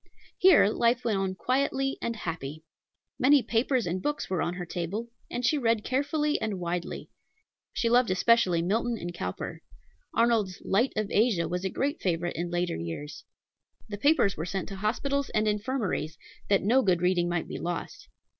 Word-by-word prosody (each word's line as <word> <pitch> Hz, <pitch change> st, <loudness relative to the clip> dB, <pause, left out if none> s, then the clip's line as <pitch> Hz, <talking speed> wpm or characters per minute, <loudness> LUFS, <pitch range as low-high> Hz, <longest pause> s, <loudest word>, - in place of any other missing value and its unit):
Here 365 Hz, -, +7 dB
life 235 Hz, +3 st, +1 dB
went 215 Hz, -4 st, +1 dB
on 190 Hz, -1 st, -1 dB
quietly 270 Hz, +4 st, 0 dB
and 230 Hz, -, -2 dB
happy. 155 Hz, -6 st, -5 dB, 0.6 s
Many 275 Hz, +1 st, +5 dB
papers 240 Hz, +2 st, +1 dB
and 180 Hz, +2 st, -2 dB
books 295 Hz, -5 st, -3 dB
were 185 Hz, -, 0 dB
on 175 Hz, -, -1 dB
her 180 Hz, 0 st, -5 dB
table, 180 Hz, +7 st, -4 dB, 0.2 s
and 245 Hz, -, -2 dB
she 300 Hz, +4 st, +2 dB
read 230 Hz, -4 st, +1 dB
carefully 295 Hz, +3 st, 0 dB
and 205 Hz, -4 st, -2 dB
widely. 175 Hz, 0 st, -4 dB, 0.6 s
She 235 Hz, -, -1 dB
loved 240 Hz, 0 st, +4 dB
especially 185 Hz, -3 st, +3 dB
Milton 230 Hz, +6 st, 0 dB
and 175 Hz, -3 st, -6 dB
Cowper. 90 Hz, -, -5 dB, 0.5 s
Arnold's 225 Hz, -6 st, +2 dB
Light 230 Hz, +7 st, +2 dB
of 215 Hz, -2 st, -2 dB
Asia 205 Hz, -7 st, +2 dB
was 180 Hz, +3 st, -3 dB
a 190 Hz, -, 0 dB
great 285 Hz, -, -2 dB
favorite 175 Hz, -1 st, -1 dB
in 170 Hz, +2 st, -3 dB
later 175 Hz, -, -1 dB
years. 85 Hz, -, -6 dB, 0.6 s
The 205 Hz, -, -5 dB
papers 280 Hz, -7 st, +3 dB
were 160 Hz, -, -4 dB
sent 185 Hz, +3 st, -3 dB
to 195 Hz, -, -7 dB
hospitals 275 Hz, +7 st, -1 dB
and 215 Hz, 0 st, +2 dB
infirmaries, 210 Hz, -, -1 dB, 0.3 s
that 200 Hz, -, +3 dB
no 245 Hz, +7 st, +4 dB
good 180 Hz, -6 st, +1 dB
reading 180 Hz, -1 st, +2 dB
might 175 Hz, -1 st, -1 dB
be -, -, -6 dB
lost. 175 Hz, 0 st, -5 dB
205 Hz, 175 wpm, -28 LUFS, 175-245 Hz, 0.6 s, Here